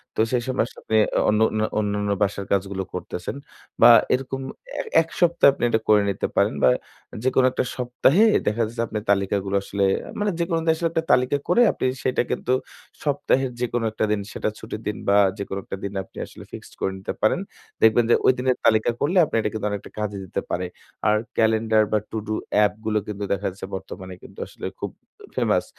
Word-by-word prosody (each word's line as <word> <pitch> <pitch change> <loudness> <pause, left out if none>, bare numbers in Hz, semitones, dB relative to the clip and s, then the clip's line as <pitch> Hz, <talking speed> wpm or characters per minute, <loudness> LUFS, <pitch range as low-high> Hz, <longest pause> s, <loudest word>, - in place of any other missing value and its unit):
তো - - +2
সেই 120 -1 +1
সময় 130 - +1
আসলে - - -14
আপনি 110 - +1 0.3
অনুন্যা 110 0 +2
অন্যান্য 105 -1 -1
বাসার 100 -1 0
কাজগুলো 95 0 0
করতেছেন। 90 +3 -5 0.5
বা 120 - +10 0.2
এরকম 135 +1 -2 0.4
এ - - +1 0.2
১ 165 - -6
সপ্তাহে 170 -4 +5
আপনি - - -6
এটা 110 - +2
করে 105 -1 +6
নিতে 100 - -1
পারেন - - +3
বা 65 - +7 0.5
যেকোনো 130 0 +3
একটা - - 0
সপ্তাহে 130 - +3 0.2
দেখা 105 +3 +1
যাচ্ছে 115 +1 -4
আপনি 105 - -3
তালিকাগুলো 100 0 0
আসলে 100 0 -2 0.4
মানে 205 0 +1
যেকোনো 170 -1 0
উদ্দেশ্যে 160 +1 +1
একটা 165 -1 0
তালিকা 125 +3 +3
করে 180 +8 +4
আপনি - - -3 0.2
সেটা 130 - +1
কিন্তু 125 - 0 0.5
সপ্তাহের 135 -2 +1
যেকোনো 120 -1 -1
এ - - +1
একটা 110 - -2 0.3
সেটা - - -2
দিন 110 - -12
ছুটির 110 0 -7
দিন 105 - -2
বা 100 - +5 0.2
যেকোনো 100 -1 -4
একটা 95 - -6
দিন 100 0 -4
আপনি - - -20
আসলে - - -13
ফিক্সড - - -10
করে 95 - 0
নিতে 95 - -4
পারেন। 110 - +3 0.4
দেখবেন 110 +2 +5
যে - - +6
ঐদিনের 130 0 +2
তালিকা 110 0 +4
করলে 170 +7 +1
আপনি - - -5
এটা 105 - 0
কিন্তু 110 -1 -3
অনেকটা 100 -1 -5
কাজে 105 -1 -2
দিতে 90 - -3
পারে। 90 +1 -1 0.4
আর 105 0 +4 0.2
ক্যালেন্ডার 110 -1 +3
বা 110 - +3
To - - -3
do 110 - -1 0.3
app 95 - 0
গুলো 110 -1 +1
কিন্তু 105 -1 -5
দেখা 100 +1 -2
যাচ্ছে 95 - -8
বর্তমানে 95 0 -8
কিন্তু - - -13
আসলে - - -9
খুব - - -4 0.4
ফেমাস। - - +1
110 Hz, 195 wpm, -23 LUFS, 100-130 Hz, 0.5 s, বা